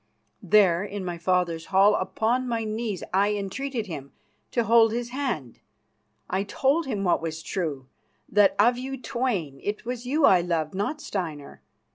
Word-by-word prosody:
There, 190 -3 +4
in 200 -1 -5
my 175 -1 -4
father's 175 -2 0
hall, 195 +2 +5
upon 225 +6 0
my 230 -2 -1
knees, 215 -3 -3
I 200 +2 +3
entreated 225 +4 -3
him 145 -7 -8 0.4
to 235 - +1
hold 225 0 +5
his 240 0 -3
hand. 240 - -3 0.7
I 190 - -1
told 270 +10 +1
him 205 -6 -2
what 180 - +2
was 160 0 -5
true: 150 -9 -3 0.4
that, 205 -1 +4
of 240 +4 +4
you 265 +1 -5
twain, 235 - -2
it 210 +2 -4
was 245 0 -5
you 290 +3 +3
I 180 -2 +6
loved, 165 -2 -1
not 210 +11 -2
Steinar. 160 -7 -5
205 Hz, 160 wpm, -26 LUFS, 175-240 Hz, 0.7 s, I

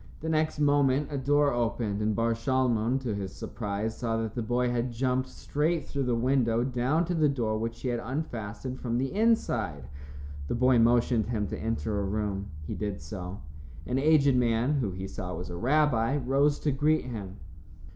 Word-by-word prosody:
The 160 - -3
next 155 0 +1
moment 145 -1 +3
a 145 - -2
door 145 +1 +3
opened, 115 -3 -1
and 105 0 +1
Bar 115 +1 +2
Shalmon, 120 0 +1
to 120 -5 -2
his 100 -2 -4
surprise, 105 0 -4
saw 115 -2 -1
that 110 -2 -3
the 120 - -2
boy 120 +2 0
had 120 +1 -1
jumped 130 +2 0
straight 155 +3 -1
through 140 -2 -2
the 125 -1 +1
window 120 -1 +2
down 130 +6 +1
to 180 - -2
the 155 -3 +3
door 115 -6 -1
which 115 +1 -4
he 130 - -1
had 120 -1 -1
unfastened 125 -3 -4
from 120 -1 -1
the 135 +5 -1
inside. 120 - +1 0.6
The - - -1
boy 125 0 +4
motioned 120 -1 +3
him 110 -3 -1
to - - -4
enter 110 -2 -1
a - - -1
room. 100 0 -2 0.2
He - - -4
did 105 -2 -3
so. 90 +4 -7 0.4
An 125 +1 0
aged 145 -2 +4
man, 120 +2 +2
who 115 -6 0
he 95 +1 -5
saw 90 -1 -5
was 90 0 -6
a - - -5
rabbi, 130 - +2
rose 140 +2 +2
to 150 - +1
greet 150 +3 +2
him. 100 -6 -6
120 Hz, 190 wpm, -28 LUFS, 110-135 Hz, 0.6 s, boy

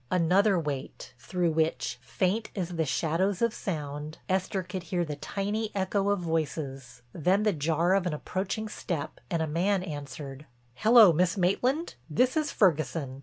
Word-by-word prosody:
Another 185 +3 +3
wait, 140 -4 -5
through 175 +3 0
which, 155 -6 0
faint 190 - -1
as 180 -4 -2
the 165 -2 -1
shadows 175 +7 0
of 235 -1 +2
sound, 150 -3 -5
Esther 190 0 0
could 185 +1 -5
hear 175 +1 -1
the 150 -2 -4
tiny 205 +7 -2
echo 195 +1 0
of 205 -2 +1
voices, 145 -7 -3
then 185 +6 +2
the 210 -2 +3
jar 165 +3 +1
of 195 -2 +2
an 170 - -1
approaching 195 +7 -3
step 170 -7 -4
and 165 -2 0
a - - -2
man 180 +5 +1
answered: 145 -3 -7 0.3
"Hello, 215 - +7
Miss 180 +4 +2
Maitland, 250 - +1 0.2
this 250 - +2
is 305 -2 0
Ferguson. 155 - +1
175 Hz, 160 wpm, -28 LUFS, 155-195 Hz, 0.3 s, Hello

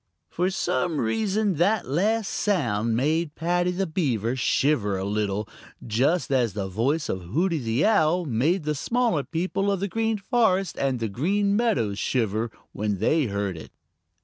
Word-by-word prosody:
For 180 +2 0
some 160 -4 -1
reason 200 - 0
that 200 +7 +2
last 200 - 0
sound 115 - 0
made 155 +4 0
Paddy 175 +2 0
the 185 +2 -1
Beaver 130 - -1
shiver 125 -5 +1
a 95 - -3
little, 105 0 -1 0.4
just 135 +10 +1
as 120 -6 +2
the 100 -2 -3
voice 130 - 0
of 95 - -3
Hooty 160 - 0
the 115 +1 0
Owl 180 -5 +3
made 150 +8 +1
the 150 +1 0
smaller 230 - 0
people 185 +5 -1
of 195 - -1
the 200 - -1
Green 225 +2 0
Forest 195 - +1
and 135 -3 0
the 115 - -1
Green 200 - 0
Meadows 120 - +1
shiver 115 -2 0 0.2
when 105 -1 -2
they 145 - +2
heard 100 -3 -2
it. 80 - -10
150 Hz, 160 wpm, -25 LUFS, 115-190 Hz, 0.4 s, Owl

